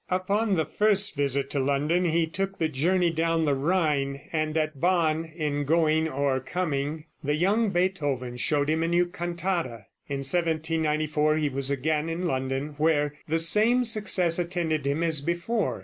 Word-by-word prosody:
Upon 200 +3 0
the 160 -3 0
first 205 +5 +2
visit 140 -1 -1
to 140 - -1
London 145 +6 +1
he 165 0 +2
took 195 +4 -4
the 160 - +1
journey 170 +5 +1
down 165 0 0
the 145 - +2
Rhine, 140 -2 0
and 155 0 -1
at 155 -3 -2
Bonn, 165 -3 +2
in 155 -3 -3
going 160 +1 +2
or 140 -2 0
coming, 150 0 -3 0.2
the 145 +1 0
young 205 +7 +2
Beethoven 145 -10 -1
showed 145 +3 +1
him 160 +1 +1
a 165 - 0
new 175 +1 +2
cantata. 175 - -3 0.2
In 140 -1 -3
1794 155 -1 +1
he 150 -2 0
was 135 0 -1
again 150 +3 -1
in 170 +2 -3
London, 135 0 -2
where 150 -2 +2
the 160 +1 +1
same 215 +9 +3
success 205 -7 +2
attended 170 -4 -1
him 145 +4 0
as 160 -4 +1
before. 170 - -1
160 Hz, 165 wpm, -26 LUFS, 145-175 Hz, 0.2 s, same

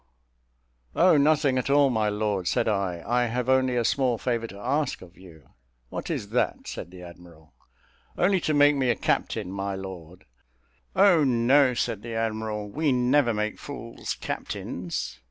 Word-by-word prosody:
"Oh, 180 -1 +5
nothing 145 -2 +3
at 130 - -3
all, 140 -1 +4
my 110 -3 +1
lord," 105 -3 -1
said - - +1
I, 95 -5 -1
"I 120 +1 +1
have 120 +1 -2
only 130 -1 +2
a 120 -1 +1
small 125 -1 +1
favour 115 -1 -2
to 100 - -11
ask 135 +5 -2
of 90 0 -16
you." 80 -6 -16 0.4
"What - - -6
is 100 - -3
that?" 125 +2 -1
said - - -6
the 90 0 -12
admiral. 85 -3 -15 0.6
"Only 185 +1 +3
to 155 - 0
make 145 0 +5
me 130 -3 +1
a 120 - +3
captain, 90 - -1
my 100 0 -3
lord." 90 -2 -9 0.7
"Oh, 190 -5 +5
no," 130 +1 +3
said 115 -3 -2
the 115 0 -6
admiral, 110 -2 -2
"we 150 +7 0
never 125 +1 +3
make 105 0 -2
fools 120 -5 -6
captains." 85 -7 -5
115 Hz, 165 wpm, -26 LUFS, 100-135 Hz, 0.7 s, Oh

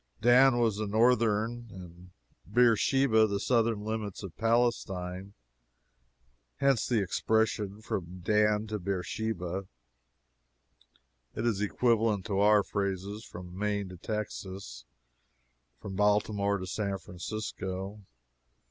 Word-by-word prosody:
Dan 120 +2 +6
was 115 -4 +2
the 110 0 -2
northern 115 +1 +2
and 90 -1 -12 0.4
Beersheba 120 0 +4
the 100 -1 -2
southern 115 -2 +1
limit 110 -2 -4
of 95 -4 -8
Palestine 100 -5 -1 1.2
hence 135 -4 +2
the 115 -5 +2
expression 110 +1 0
"from 90 -3 -5
Dan 105 +2 +2
to 110 -1 -4
Beersheba." 95 0 -3 1.7
It 110 - -2
is 110 -4 +1
equivalent 110 -2 +1
to 100 -3 -1
our 105 0 +5
phrases 100 +2 -3
"from 90 0 -10
Maine 100 -1 -1
to 90 - -10
Texas" 95 - -6 0.9
"from 95 - -7
Baltimore 105 -1 +2
to 95 - -5
San 100 +1 -2
Francisco." 95 +2 -6
105 Hz, 105 wpm, -30 LUFS, 95-110 Hz, 1.7 s, Dan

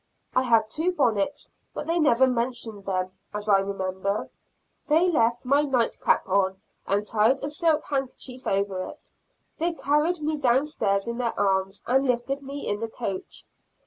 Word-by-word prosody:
I 255 - +5
had 230 -4 +3
two 325 +10 0
bonnets, 255 - 0 0.2
but - - -4
they 335 +2 +1
never 265 -5 +5
mentioned 235 -4 -2
them, 185 -1 -1 0.2
as 210 0 -4
I 200 -2 +5
remember. 195 0 -2 0.6
They 320 +4 +4
left 235 -4 +1
my 280 +3 +4
night 260 -6 +1
cap - - +2
on, 190 0 +1 0.3
and 205 +1 +1
tied 225 +5 +2
a 290 - -2
silk 310 -1 +2
handkerchief 265 -2 -4
over 195 -1 0
it. - - -9 0.5
They 340 +2 +1
carried 310 +3 +1
me 305 0 -1
down 265 0 +3
stairs 200 -8 0
in 235 +1 -3
their 235 -2 -1
arms, 195 -1 0
and 265 +2 +2
lifted 250 +3 0
me 280 +1 -6
in 205 - -1
the 225 0 -3
coach. 200 -5 -6
240 Hz, 170 wpm, -26 LUFS, 200-285 Hz, 0.6 s, I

